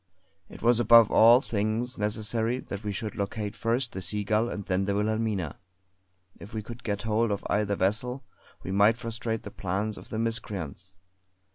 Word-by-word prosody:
It -, -, -12 dB
was 120 Hz, 0 st, +4 dB
above 115 Hz, -1 st, +7 dB
all 120 Hz, +3 st, +7 dB
things 115 Hz, +1 st, -2 dB
necessary 110 Hz, +3 st, -1 dB
that 100 Hz, -4 st, -7 dB
we 105 Hz, -, -2 dB
should 105 Hz, +2 st, -4 dB
locate 105 Hz, +1 st, -3 dB
first 120 Hz, +2 st, 0 dB
the 95 Hz, -, -6 dB
Seagull 105 Hz, +4 st, 0 dB
and 100 Hz, -4 st, -5 dB
then 95 Hz, +1 st, 0 dB
the 100 Hz, 0 st, 0 dB
Wilhelmina. 105 Hz, -5 st, -1 dB, 0.8 s
If 105 Hz, +2 st, -10 dB
we 110 Hz, -, -3 dB
could 120 Hz, +3 st, -10 dB
get 100 Hz, -1 st, -2 dB
hold 110 Hz, +1 st, +1 dB
of 100 Hz, -1 st, -3 dB
either 105 Hz, -1 st, +1 dB
vessel 120 Hz, +8 st, -1 dB, 0.4 s
we 95 Hz, -, -5 dB
might 100 Hz, +4 st, +4 dB
frustrate 115 Hz, -1 st, -4 dB
the -, -, -8 dB
plans 100 Hz, +3 st, -3 dB
of -, -, -14 dB
the 110 Hz, -, -4 dB
miscreants. 100 Hz, -6 st, -4 dB
110 Hz, 170 wpm, -28 LUFS, 100-115 Hz, 0.8 s, above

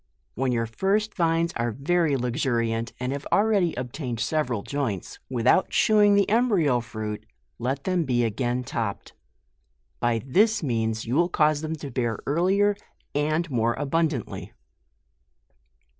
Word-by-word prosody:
When 130 Hz, +2 st, 0 dB
your 115 Hz, -1 st, 0 dB
first 195 Hz, -, 0 dB
vines 165 Hz, -2 st, +1 dB
are 120 Hz, 0 st, 0 dB
very 145 Hz, +4 st, +1 dB
luxuriant, 120 Hz, -2 st, -1 dB
and 125 Hz, +1 st, -2 dB
have 140 Hz, +1 st, -4 dB
already 200 Hz, -5 st, +3 dB
obtained 125 Hz, -1 st, -4 dB
several 125 Hz, -7 st, -1 dB
joints, 130 Hz, -10 st, -3 dB
without 125 Hz, +8 st, +2 dB
shewing 210 Hz, -2 st, +4 dB
the 200 Hz, -1 st, +3 dB
embryo 200 Hz, -, +3 dB
iruit, 110 Hz, -2 st, -5 dB, 0.4 s
let 135 Hz, +3 st, -2 dB
them 185 Hz, -2 st, +1 dB
be 125 Hz, -4 st, +1 dB
again 120 Hz, +3 st, -1 dB
topped; 110 Hz, -4 st, -4 dB, 0.9 s
by 120 Hz, -2 st, 0 dB
this 210 Hz, -, +3 dB
means 115 Hz, -4 st, -1 dB
you 120 Hz, -, -3 dB
will 170 Hz, +5 st, +3 dB
cause 155 Hz, -3 st, +2 dB
them 160 Hz, 0 st, -3 dB
to 145 Hz, -3 st, -8 dB
bear 120 Hz, -2 st, -1 dB
earlier, 190 Hz, +7 st, +2 dB, 0.4 s
and 155 Hz, +3 st, 0 dB
more 120 Hz, -1 st, +1 dB
abun 160 Hz, +3 st, +1 dB
dantly. 130 Hz, -8 st, -6 dB
135 Hz, 140 wpm, -25 LUFS, 120-170 Hz, 0.9 s, shewing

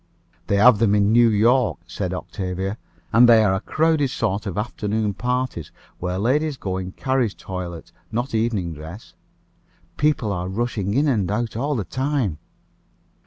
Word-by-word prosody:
"They 100 Hz, -, +1 dB
have 105 Hz, +1 st, +6 dB
them 105 Hz, -2 st, +3 dB
in 100 Hz, 0 st, +3 dB
New 120 Hz, 0 st, +6 dB
York," 115 Hz, +2 st, +3 dB
said 90 Hz, +1 st, -4 dB
Octavia; 95 Hz, +2 st, -4 dB, 0.3 s
"and 120 Hz, +1 st, +7 dB
they 115 Hz, -2 st, +7 dB
are 100 Hz, -3 st, +3 dB
a 95 Hz, -, 0 dB
crowded 155 Hz, -1 st, +1 dB
sort 105 Hz, -5 st, -2 dB
of 100 Hz, -, -4 dB
afternoon 105 Hz, -1 st, -1 dB
parties, 125 Hz, -, -2 dB, 0.3 s
where 90 Hz, +1 st, -2 dB
ladies 140 Hz, +7 st, +1 dB
go 95 Hz, -5 st, -3 dB
in 95 Hz, 0 st, -5 dB
carriage 130 Hz, -5 st, -1 dB
toilet, 90 Hz, -3 st, -7 dB, 0.2 s
not 120 Hz, +4 st, -2 dB
evening 110 Hz, -7 st, 0 dB
dress. 80 Hz, +8 st, -10 dB, 0.8 s
People 145 Hz, -8 st, +1 dB
are 90 Hz, -1 st, -3 dB
rushing 105 Hz, -1 st, -2 dB
in 145 Hz, +3 st, +3 dB
and 105 Hz, -10 st, +1 dB
out 110 Hz, +1 st, -2 dB
all 140 Hz, +5 st, -1 dB
the 110 Hz, -, -1 dB
time." 130 Hz, -, -1 dB
110 Hz, 160 wpm, -22 LUFS, 95-125 Hz, 0.8 s, and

